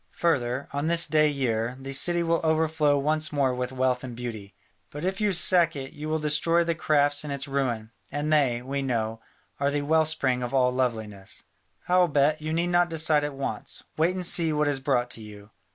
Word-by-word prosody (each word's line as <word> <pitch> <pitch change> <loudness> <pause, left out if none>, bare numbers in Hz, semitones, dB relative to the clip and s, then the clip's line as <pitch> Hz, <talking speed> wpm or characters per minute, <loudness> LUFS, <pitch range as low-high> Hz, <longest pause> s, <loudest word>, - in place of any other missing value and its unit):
Further, 130 -5 0
on 145 +2 -1
this 170 0 +4
day 155 -1 +3
year, 125 -3 -1
the 135 +1 -7
city 170 +5 +3
will 165 0 +1
overflow 160 -2 +2
once 155 +2 0
more 140 -3 +1
with 125 0 -3
wealth 130 -1 0
and 125 -2 -7
beauty. 115 -5 -7 0.3
But 145 +4 -6
if 190 +2 -2
you 210 -1 +2
sack 175 -2 +3
it, 135 -1 -7
you 150 +1 -6
will 160 - +1
destroy 155 +3 +2
the 170 0 0
crafts 145 -3 +1
in 150 - -6
its 140 0 -4
ruin, 125 -6 -2 0.2
and 145 +2 -1
they, 125 -5 +2
we 140 +2 -3
know, 115 -4 -2 0.4
are 140 0 +1
the 145 0 -1
well 160 +2 +3
spring 130 -5 0
of 125 +2 -3
all 125 -1 +3
loveliness. 110 -6 -3 0.4
Howbeit, 155 -4 +2
you 155 +1 -4
need 170 +2 0
not 175 0 +3
decide 160 -2 +1
at 145 -1 -4
once, 135 0 -4
wait 165 +4 +1
and 185 -1 -1
see 170 -2 +2
what 150 -1 +1
is 145 -2 0
brought 125 -2 0
to 115 - -4
you. 105 0 -12
145 Hz, 205 wpm, -26 LUFS, 125-160 Hz, 0.4 s, this